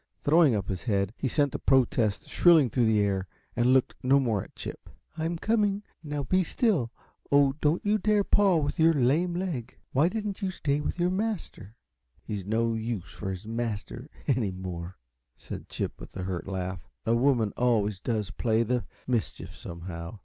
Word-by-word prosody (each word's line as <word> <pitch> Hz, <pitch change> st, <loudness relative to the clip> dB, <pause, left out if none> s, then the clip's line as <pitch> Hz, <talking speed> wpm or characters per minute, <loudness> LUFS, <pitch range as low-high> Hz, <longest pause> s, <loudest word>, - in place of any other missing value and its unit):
Throwing 150 Hz, -4 st, +5 dB
up 100 Hz, -3 st, -2 dB
his 95 Hz, -3 st, -3 dB
head, 100 Hz, 0 st, 0 dB
he 135 Hz, -, -2 dB
sent 145 Hz, +2 st, +1 dB
a -, -, -3 dB
protest 120 Hz, -5 st, +2 dB
shrilling 160 Hz, -9 st, +5 dB
through 120 Hz, -3 st, +2 dB
the 110 Hz, -1 st, +3 dB
air, 95 Hz, -2 st, 0 dB, 0.3 s
and 120 Hz, 0 st, +2 dB
looked 130 Hz, -1 st, +3 dB
no 135 Hz, +2 st, +4 dB
more 115 Hz, -7 st, +1 dB
at -, -, -17 dB
Chip. -, -, -8 dB, 0.3 s
"I'm 165 Hz, +1 st, -2 dB
coming, 210 Hz, 0 st, +1 dB, 0.2 s
now 145 Hz, -2 st, -3 dB
be 185 Hz, +7 st, +2 dB
still. 170 Hz, -, +1 dB, 0.4 s
Oh, 140 Hz, -1 st, +5 dB
don't 155 Hz, +6 st, +1 dB
you 210 Hz, +1 st, +3 dB
dare 210 Hz, 0 st, +3 dB
paw 195 Hz, -3 st, +4 dB
with 145 Hz, -1 st, -1 dB
your 165 Hz, 0 st, +5 dB
lame 150 Hz, +7 st, +2 dB
leg! 175 Hz, -10 st, -4 dB
Why 150 Hz, +6 st, +3 dB
didn't 210 Hz, -1 st, -4 dB
you 195 Hz, -, 0 dB
stay 150 Hz, -5 st, -1 dB
with 160 Hz, -, -3 dB
your 175 Hz, +1 st, +2 dB
master?" 190 Hz, -, -3 dB, 0.5 s
"He's 105 Hz, -2 st, -4 dB
no 115 Hz, +3 st, +1 dB
use 110 Hz, -4 st, -4 dB
for 95 Hz, -, -5 dB
his 95 Hz, +1 st, -5 dB
master, 115 Hz, +3 st, -4 dB, 0.2 s
any 125 Hz, -7 st, +1 dB
more," 90 Hz, -1 st, -6 dB, 0.4 s
said -, -, -8 dB
Chip, -, -, -4 dB
with -, -, -10 dB
a 95 Hz, -, -3 dB
hurt 90 Hz, -1 st, -4 dB
laugh. 95 Hz, -1 st, -4 dB, 0.2 s
"A 115 Hz, -, +2 dB
woman 120 Hz, -4 st, +2 dB
always 105 Hz, -5 st, +1 dB
does 105 Hz, -5 st, -2 dB
play 110 Hz, -, +1 dB
the 125 Hz, +1 st, -1 dB, 0.2 s
mischief, 120 Hz, -4 st, -2 dB
somehow. 85 Hz, +2 st, -7 dB
125 Hz, 180 wpm, -28 LUFS, 105-160 Hz, 0.5 s, Throwing